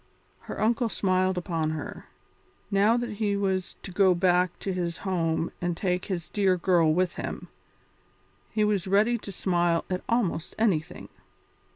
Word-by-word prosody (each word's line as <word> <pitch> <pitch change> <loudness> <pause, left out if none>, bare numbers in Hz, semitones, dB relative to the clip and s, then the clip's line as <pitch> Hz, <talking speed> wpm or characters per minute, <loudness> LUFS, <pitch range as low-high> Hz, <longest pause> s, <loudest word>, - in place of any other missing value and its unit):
Her - - -8
uncle 230 +2 +2
smiled 185 -2 +1
upon 165 -3 -1
her. 145 - -8 0.6
Now 205 +4 +4
that 240 -3 -4
he 205 -2 0
was 190 -2 -1
to 195 - -7
go 185 0 +4
back 180 0 +2
to 195 - -2
his 175 -2 -2
home 165 -3 0
and 175 -1 -1
take 180 -1 -1
this 175 -4 -3
dear 195 -3 +2
girl 170 -3 +3
with 180 +2 +1
him, - - -6 1.0
he 215 -1 0
was 205 -3 +1
ready 215 +5 +3
to 200 - -8
smile 175 -3 +1
at 185 - -1
almost 215 -9 0
anything. 185 -9 0
185 Hz, 155 wpm, -27 LUFS, 175-205 Hz, 1.0 s, Now